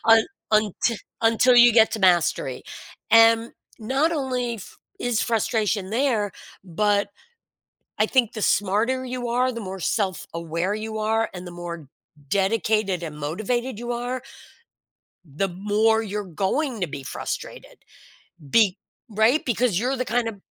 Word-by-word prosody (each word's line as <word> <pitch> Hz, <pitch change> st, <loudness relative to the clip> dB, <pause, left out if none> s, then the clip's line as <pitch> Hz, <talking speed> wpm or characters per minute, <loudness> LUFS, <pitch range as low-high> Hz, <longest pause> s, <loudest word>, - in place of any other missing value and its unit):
un 225 Hz, -1 st, +6 dB, 0.3 s
unti 215 Hz, +2 st, +1 dB, 0.2 s
until 230 Hz, +2 st, +4 dB
you 240 Hz, -1 st, +8 dB
get 225 Hz, -1 st, +5 dB
to 220 Hz, -, -2 dB
mastery." 180 Hz, -3 st, +2 dB, 0.5 s
And 225 Hz, 0 st, +5 dB, 0.3 s
not 270 Hz, +9 st, 0 dB
only 250 Hz, -5 st, -2 dB
f 195 Hz, -, -12 dB, 0.2 s
is 245 Hz, -3 st, 0 dB
frustration 215 Hz, -3 st, 0 dB
there, 225 Hz, -4 st, 0 dB, 0.3 s
but 200 Hz, +3 st, +1 dB, 0.9 s
I 215 Hz, -, +5 dB
think 240 Hz, -2 st, +1 dB
the 215 Hz, -, -5 dB
smarter 215 Hz, +8 st, +1 dB
you 250 Hz, -1 st, -4 dB
are, 250 Hz, +2 st, +1 dB
the 235 Hz, -1 st, -6 dB
more 190 Hz, -1 st, -6 dB
self-aware 175 Hz, -1 st, -2 dB
you 220 Hz, 0 st, -5 dB
are, 225 Hz, +1 st, 0 dB
and 180 Hz, -1 st, -8 dB
the -, -, -8 dB
more 170 Hz, -3 st, -7 dB, 0.4 s
dedicated 200 Hz, -1 st, +1 dB
and 150 Hz, -2 st, -6 dB
motivated 215 Hz, -, -2 dB
you 240 Hz, 0 st, -4 dB
are 245 Hz, +1 st, -3 dB, 1.0 s
the 160 Hz, +6 st, -2 dB
more 210 Hz, +4 st, +1 dB
you're 210 Hz, 0 st, -4 dB
going 205 Hz, -, -2 dB
to 180 Hz, -, 0 dB
be 145 Hz, -3 st, -7 dB
frustrated, -, -, -7 dB, 0.7 s
be 205 Hz, +1 st, +4 dB, 0.3 s
Right? 220 Hz, +8 st, +2 dB
Because 235 Hz, -5 st, +1 dB
you're 255 Hz, +4 st, 0 dB
the 255 Hz, -, -1 dB
kind 240 Hz, 0 st, 0 dB
of 205 Hz, -4 st, -7 dB
220 Hz, 140 wpm, -24 LUFS, 190-240 Hz, 1.0 s, you